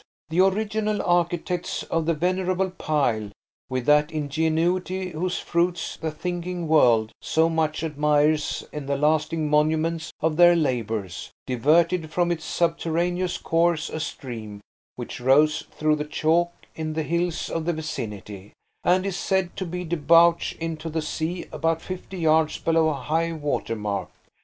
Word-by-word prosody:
The 170 +3 +3
original 215 +2 0
architects 175 0 0
of 165 -1 -2
the 165 - +2
venerable 185 +2 0
pile, 135 - 0 0.4
with 130 -1 -2
that 150 +1 +4
ingenuity 160 +5 0
whose 180 +3 -2
fruits 170 0 -1
the 160 - -3
thinking 175 +2 -4
world 120 -8 +4
so 160 +1 +2
much 160 -1 0
admires 150 0 +1
in 150 -2 -6
the 140 0 0
lasting 155 +1 +1
monuments 155 +2 +1
of 155 0 0
their 175 0 +7
labours, 110 - -2 0.2
diverted 160 +6 +2
from 175 +1 +1
its 160 -2 -3
subterraneous 175 +2 0
course 165 -1 +1
a 155 - -4
stream 110 -9 -6 0.3
which - - -7
rose 150 +4 +3
through 155 0 +1
the 150 - -3
chalk 165 +3 +1 0.2
in 155 -1 -4
the 160 0 -1
hills 170 +2 -1
of 165 -1 -2
the 175 - +1
vicinity, 105 - -6 0.3
and 185 +2 +3
is 195 -2 -2
said 190 -1 0
to 190 - -3
be 180 +1 -4
debouch 170 +1 +4
into 165 -1 -4
the 160 0 -2
sea 160 +3 -3
about 165 0 0
fifty 185 +2 -7
yards 160 -2 +2
below 165 -1 +2
high 160 +4 -1
water 145 -6 -2
mark. 105 -2 -3
160 Hz, 145 wpm, -24 LUFS, 150-175 Hz, 0.4 s, their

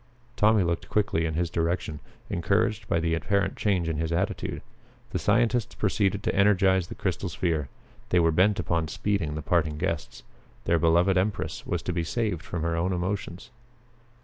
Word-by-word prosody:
Tommy 105 -1 +4
looked 85 -1 -2
quickly 100 -6 +1
in 80 - -3
his 85 0 -1
direction, 85 -2 -1 0.3
encouraged 105 +4 0
by 85 - +1
the 80 0 0
apparent 100 +3 0
change 95 -5 0
in 80 -2 -1
his 80 +1 -2
attitude. 85 +1 -2 0.5
The - - -1
scientists 115 +1 +1
proceeded 100 -1 0
to 110 - 0
energize 95 -2 +3
the - - -8
crystal - - -2
sphere. 80 -7 -1 0.4
They 90 - +4
were 80 -1 +4
bent 95 +5 +3
upon 85 -1 0
speeding 85 -3 -1
the 75 - -5
parting 80 -3 +1
guests. 85 -7 -3 0.4
Their 85 - +3
beloved 85 +4 +4
empress 100 +2 -2
was - - -2
to 90 - -2
be 85 -1 -1
saved 105 -1 -1
from 85 -2 -4
her 85 0 0
own 90 +3 0
emotions. 90 +4 -4
90 Hz, 175 wpm, -27 LUFS, 80-100 Hz, 0.5 s, Tommy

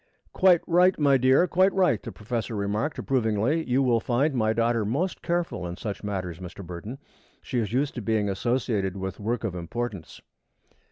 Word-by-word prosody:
"Quite 185 -3 +5
right, 180 +2 +4
my 140 -3 +4
dear 130 +6 +4
quite 185 +2 +3
right," 180 - +2
the - - -7
professor 115 +1 -4
remarked, 105 +8 -2
approvingly. 125 +4 0
"You 130 +2 +3
will 120 -3 +3
find 130 +6 +1
my 110 -4 +1
daughter 115 0 +1
most 145 - -2
careful 170 - -2
in 85 +1 -6
such 100 -1 -5
matters, 90 -5 -4
Mr. 90 +1 -9
Burton. 90 +9 -7 0.5
She 125 - -2
is 110 -3 -2
used 135 +4 0
to 120 - -5
being 105 -1 0
associated 100 -2 -1
with 95 -1 -5
work 115 +3 -2
of 110 -5 -2
importance." 95 +1 -5
115 Hz, 175 wpm, -26 LUFS, 100-135 Hz, 0.5 s, Quite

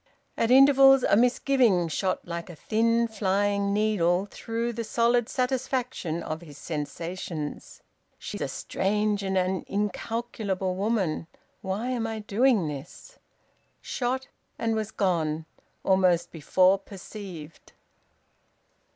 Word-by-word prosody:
At 230 - +1
intervals 270 0 +7
a - - +4
misgiving 240 -5 +3
shot 185 +4 -2
like 170 +1 -5
a 175 - -9
thin 230 +6 +1
flying 200 -1 0
needle 200 -3 +2
through 230 +1 -3
the 230 +1 -3
solid 235 +1 +2
satisfaction 250 - -2
of 155 +1 -4
his 150 -4 -12
sensations: 160 0 -5 0.3
"She - - -6
is - - -9
a - - 0
strange 210 +1 -1
and 190 -1 -1
an 185 0 0
incalculable 205 -1 -2
woman 195 -6 -1 0.3
why 200 +6 -3
am 240 -3 -1
I 225 0 -4
doing 215 -2 +2
this?" 145 - -9 0.6
Shot, 260 +1 -2 0.3
and 225 -1 0
was 215 -1 -2
gone, 165 -6 0 0.4
almost 180 -3 +3
before 185 +5 +3
perceived! 190 -5 -10
200 Hz, 115 wpm, -27 LUFS, 180-230 Hz, 0.6 s, intervals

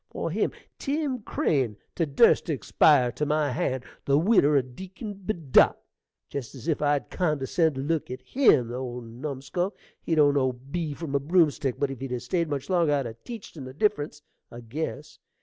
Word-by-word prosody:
for - - -4
him - - 0 0.3
Tim 280 -3 -1
Crane 130 - 0 0.2
to 165 - 0
durst 165 +11 +4
to 160 - 0
expire 130 +1 +4
to 150 - -4
my 150 -1 +1
hand, 130 +1 -1 0.2
the 140 0 +3
widder 155 -5 +4
o' 135 - +3
Deacon 190 - -8
Bedott! 180 - +3 0.5
Jest 140 -2 -6
as 135 +4 -10
if 155 -4 0
I'd 145 -1 +1
condescen' 155 -2 +1
to 135 - -3
look 155 +2 -1
at 130 +1 -7
him, 185 - +3
the 120 - -4
old 125 -1 -5
numskull! 140 - -4 0.3
He 165 - 0
don't 145 -2 +5
know 130 -2 +2
B 145 +5 -5
from 160 -3 -6
a 140 - +3
broomstick; 150 -4 +2
but 140 -1 0
if 135 - -7
he'd 135 -2 -4
'a' 125 - -1
stayed 160 +7 -1
much 140 -2 -3
longer 170 -5 +2
I'd 140 -2 -1
'a' 115 - -5
teached 215 - -10
him 140 -5 -7
the 130 - -9
difference, 150 -6 -1 0.3
I 120 - -10
guess. 150 +5 -5
145 Hz, 195 wpm, -26 LUFS, 130-170 Hz, 0.5 s, don't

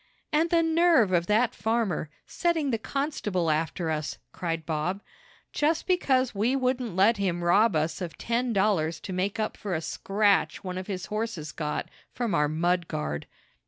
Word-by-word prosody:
"And 320 +3 +3
the 335 -1 +3
nerve 325 - +4
of 175 -1 +2
that 230 +3 +3
farmer, 220 -9 -1 0.2
setting 325 -5 0
the 225 - 0
constable 210 - -1
after 160 +2 -1
us!" 155 -1 -3
cried 165 -3 -3
Bob. 170 +5 -2 0.5
"Just 310 +2 +1
because 265 -9 +2
we 220 +6 +1
wouldn't 255 -5 -1
let 205 +4 +4
him 180 -3 -1
rob 200 +3 +4
us 155 +2 -1
of 170 -4 -5
ten 240 +1 -1
dollars 190 -6 +1
to 190 - -6
make 195 +4 -1
up 215 - -1
for 195 -4 -3
a - - 0
scratch 200 +4 +1
one 185 -1 -4
of 185 - -7
his 190 -3 -4
horses 210 -9 -3
got 150 -2 -3 0.3
from 240 -4 -1
our 150 0 +3
mud 170 +3 0
guard." 75 - -3
200 Hz, 170 wpm, -27 LUFS, 170-245 Hz, 0.5 s, nerve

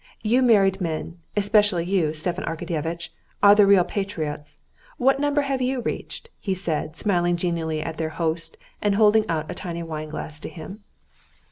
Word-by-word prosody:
You 235 +4 +3
married 200 -6 +4
men, 165 0 -3 0.2
especially 205 -4 +3
you, 180 -5 +1
Stepan 170 +4 -2
Arkadyevitch, 165 0 -3 0.3
are 200 0 +9
the 205 -1 +6
real 195 -2 +6
patriots: 160 -7 -4 0.4
what 270 +2 +3
number 290 0 +2
have 275 -2 -1
you 255 +1 0
reached?" 465 - -5
he 195 -3 -2
said, 160 -3 -3
smiling 175 -4 +2
genially 165 -3 -1
at 160 -1 -5
their 160 -1 -2
host 165 0 -2 0.2
and 205 -1 +2
holding 215 +1 +4
out 160 -2 -2
a - - -3
tiny 170 -3 -5
wine 155 -2 -5
glass 155 0 -6
to - - -7
him. 195 +5 -10
175 Hz, 165 wpm, -24 LUFS, 160-205 Hz, 0.4 s, are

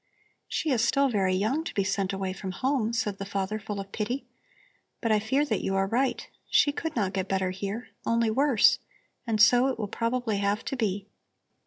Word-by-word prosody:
"She 310 - -1
is 235 -4 +2
still 275 +3 +3
very 190 -5 +1
young 225 +12 0
to - - -6
be 200 - +2
sent 195 0 -1
away 190 -1 -3
from 190 -1 -6
home," 255 0 0
said 210 -4 -2
the - - -3
father, 195 +1 -2
full 205 -1 -5
of 195 0 -7
pity. 240 +6 -3 0.7
"But 230 - 0
I 215 - +4
fear 265 +8 +1
that 220 -8 -1
you 195 - -1
are 195 0 +2
right. 250 +7 0 0.2
She 290 - +4
could 320 +2 -4
not 200 -5 0
get 190 0 -2
better 190 -1 0
here, 200 +5 -5
only 230 -1 +2
worse, 265 -2 +4 0.5
and 220 -2 0
so 245 +4 +6
it 265 - -1
will 210 - -3
probably 230 0 -1
have 200 +2 0
to - - -2
be. 205 -5 -1
215 Hz, 205 wpm, -27 LUFS, 195-245 Hz, 0.7 s, so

